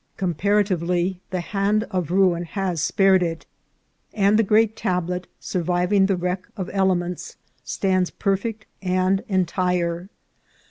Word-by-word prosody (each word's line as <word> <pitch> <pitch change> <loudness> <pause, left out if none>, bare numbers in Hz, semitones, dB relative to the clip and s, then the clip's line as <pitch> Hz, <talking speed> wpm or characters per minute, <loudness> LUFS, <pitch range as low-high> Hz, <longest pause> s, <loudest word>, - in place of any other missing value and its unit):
Comparatively, 180 -1 0
the 185 -1 -2
hand 200 +3 0
of 180 -5 -1
ruin 180 -2 +3
has 180 -2 -2
spared 195 +1 +4
it, 165 -2 -2 0.7
and 205 +1 +4
the - - +7
great 220 +1 +3
tablet, 180 0 -2
surviving 180 +3 +1
the 195 - +2
wreck 180 +1 -3
of 190 -3 -4
elements, 180 -3 0 0.3
stands 185 +8 0
perfect 210 +2 -2 0.2
and 185 +1 +1
entire. 180 -1 0
185 Hz, 120 wpm, -23 LUFS, 180-195 Hz, 0.7 s, the